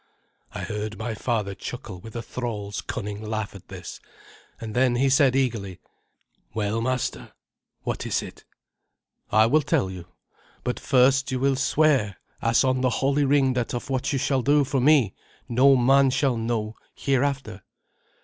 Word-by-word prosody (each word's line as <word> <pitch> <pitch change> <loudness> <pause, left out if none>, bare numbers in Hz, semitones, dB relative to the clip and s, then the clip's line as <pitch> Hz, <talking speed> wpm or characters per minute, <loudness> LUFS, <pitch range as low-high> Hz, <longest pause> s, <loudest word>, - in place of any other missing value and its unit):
I - - -6
heard 105 0 -4
my 115 +1 -3
father 105 -3 -2
chuckle 105 -2 -7
with 115 +2 -11
a 115 - -4
thrall's 105 -5 -4
cunning 105 0 -5
laugh 110 -1 -3
at 100 - -13
this, - - -9 0.6
and 110 -2 -6
then 125 0 +3
he 135 +3 +2
said 135 -2 +4
eagerly, 115 -9 -1 0.8
"Well, 110 +1 -1
master, 130 +1 -2 0.5
what - - -3
is - - 0
it?" - - -11 0.9
"I 110 0 +5
will 150 +7 +3
tell 95 -8 0
you. 90 -2 -9 0.6
But 125 - -2
first 135 0 +3
will 130 +2 +1
you - - 0
swear 135 - +2 0.2
as 115 +2 +3
on 130 -1 +1
the 130 - +3
holy 140 +3 +1
ring 135 -1 +3
that 125 -1 -2
of 120 +3 -5
what 130 -1 -1
you 140 - 0
shall 135 0 +1
do 145 +3 +3
for 135 -1 -1
me 135 -7 +4 0.3
no 135 +3 +5
man 135 +2 +4
shall 130 -1 +1
know 115 -1 -2 0.2
hereafter?" 135 -6 -1
125 Hz, 160 wpm, -25 LUFS, 110-135 Hz, 0.9 s, I